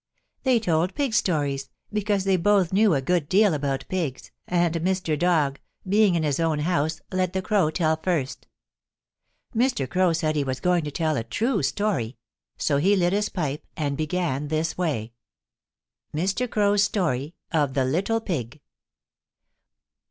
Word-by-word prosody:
They 255 -3 +3
told 175 -2 0
pig 275 -5 -1
stories 145 -10 0 0.2
because 205 -2 0
they 195 -1 +2
both 190 0 +2
knew 205 -3 +4
a 135 - -1
good 170 -2 0
deal 200 -1 +4
about 140 -2 -2
pigs, 165 -9 -3 0.2
and 175 -2 +1
Mr. 180 -2 0
Dog, 150 -4 +1 0.3
being 200 -1 +4
in 165 - +1
his 145 -1 0
own 165 -2 +1
house, 160 -1 0
let 185 -1 0
the 190 - 0
Crow 195 -6 +2
tell 160 -1 +1
first. 160 -5 -2 1.1
Mr. 235 - +1
Crow 185 +2 +2
said 155 -2 0
he 145 - +1
was 130 -1 -3
going 180 -2 +2
to - - -2
tell 155 0 0
a 115 - -1
true 215 - 0
story, 185 - -1 0.4
so 140 - +1
he 190 +8 +3
lit 180 -1 +2
his 205 +1 +1
pipe 150 -5 -3
and 145 -3 -1
began 155 -2 -1
this 160 +2 -1
way: 135 -11 -2 1.0
MR. 195 +10 0
CROW'S 205 -1 +2
STORY 165 - 0 0.2
OF 145 -5 +1
THE 135 -2 +2
LITTLE 195 - 0
PIG. 150 - -4
170 Hz, 160 wpm, -25 LUFS, 150-195 Hz, 1.1 s, knew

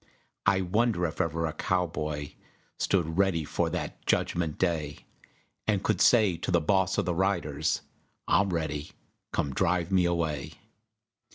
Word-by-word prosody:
I 95 -1 +4
wonder 100 0 +1
if 80 - -2
ever 80 0 -1
a 80 - -2
cowboy 75 -5 -2 0.5
Stood 85 -2 0
ready 95 -5 +2
for - - -1
that - - -5
Judgment 85 -3 0
Day, 80 -5 -1 0.6
And 100 -3 +1
could 105 -5 +1
say 105 -8 +5
to - - -4
the 85 -2 +4
Boss 95 +3 +1
of - - +1
the 90 - 0
Riders, 85 -5 0 0.4
"I'm 100 0 +3
ready, 80 -4 -3 0.4
come 70 -2 -1
drive 90 +2 +1
me 90 -2 +4
away." 80 -5 -1
85 Hz, 145 wpm, -28 LUFS, 80-95 Hz, 0.6 s, say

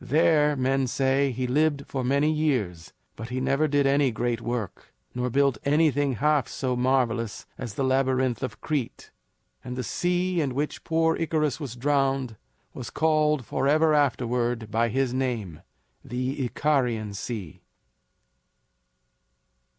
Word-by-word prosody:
There, 150 +2 +3
men 135 0 +1
say, 135 +2 +1
he 125 +1 -3
lived 145 +2 +1
for 130 -2 -4
many 140 +4 +2
years, 125 - -1 0.2
but 110 +2 -7
he 125 +1 -2
never 135 +4 +1
did 145 -1 +2
any 140 0 +3
great 120 0 -2
work, 120 -4 -5 0.2
nor 125 0 -2
built 135 -2 +2
anything 145 -2 +2
half 145 0 +1
so 130 -2 -2
marvelous 125 -3 0
as 120 -5 -7
the 140 - -1
Labyrinth 130 -1 +1
of 130 - -5
Crete. 145 -7 -3 0.5
And 125 0 -6
the 125 - -3
sea 180 +5 0
in 135 -4 -2
which 150 +2 -3
poor 160 0 +2
Icarus 155 -3 0
was 135 -6 -6
drowned 135 -2 0 0.4
was 125 - -7
called 150 -3 +1
forever 155 +6 +2
afterward 120 -5 0
by 115 +1 +1
his 130 +1 0
name, 120 - -3 0.4
the 130 +3 -3
Icarian 120 -6 0
Sea. 100 - -6
130 Hz, 135 wpm, -26 LUFS, 120-145 Hz, 0.5 s, There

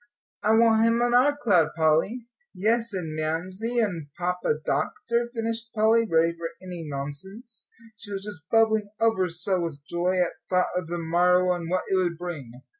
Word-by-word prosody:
"I 220 +1 +3
want 225 -1 +5
him 230 +1 +3
on 240 0 +1
our 280 +4 +4
cloud, 190 - +2
Polly." 165 +9 +2 0.3
"Yes, 225 +4 +1
and 170 -5 -4
Mamsie 185 +9 -2
and 180 -10 0
Papa 180 -3 0
Doctor," 235 0 -1
finished 230 0 -3
Polly, 225 +1 +4
ready 165 +1 +3
for 165 0 -4
any 180 -3 -7
nonsense, 190 - -5 0.3
she 205 0 -10
was 195 -1 -4
just 180 -5 -9
bubbling 220 -2 +3
over 225 -5 +2
so 175 +3 -1
with 145 -4 -5
joy 180 +2 0
at 175 -1 +2 0.2
thought 180 -1 +1
of 180 -2 -2
the 175 +1 -3
morrow 180 +2 +3
and 170 -2 -5
what 185 +1 0
it - - -1
would 175 -3 0
bring. 160 -9 -6
185 Hz, 175 wpm, -26 LUFS, 170-225 Hz, 0.3 s, want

